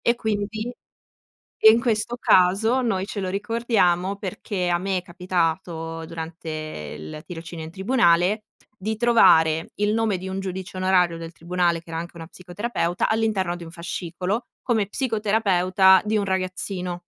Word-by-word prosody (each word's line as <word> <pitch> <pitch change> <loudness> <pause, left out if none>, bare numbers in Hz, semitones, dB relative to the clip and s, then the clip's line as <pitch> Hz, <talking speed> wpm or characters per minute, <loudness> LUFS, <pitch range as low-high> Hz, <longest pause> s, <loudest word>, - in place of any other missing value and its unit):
E 235 - +2
quindi 220 +1 -3 0.9
e 220 - +9
in 230 - +3
questo 235 0 0
caso, 205 +8 +4
noi 195 -6 0
ce 205 - -6
lo 190 -2 -2
ricordiamo 200 -3 +1
perché 190 -1 -3
a 175 - +2
me 190 0 -1
è - - -5
capitato 170 -2 -2
durante 165 0 -7 0.5
il 80 - -9
tirocinio 165 -1 -7
in 160 - -9
tribunale, 195 -1 +2 0.3
di 220 +3 -3
trovare 175 -9 +4
il 210 0 +2
nome 220 -4 +1
di 185 +1 -6
un 190 +1 -4
giudice 190 0 -5
onorario 180 -2 +2
del 165 0 -8
tribunale, 170 0 0
che 170 - -15
era 165 - -3
anche 170 +1 -7
una 165 -1 -8
psicoterapeuta 180 0 -2
all'interno 210 -6 0
di 175 - -9
un 165 - -11
fascicolo, 180 +5 -3 0.2
come 220 -5 +1
psicoterapeuta 200 -5 +3
di 215 +1 0
un 210 - +2
ragazzino 185 -1 -3
185 Hz, 155 wpm, -23 LUFS, 175-215 Hz, 0.9 s, e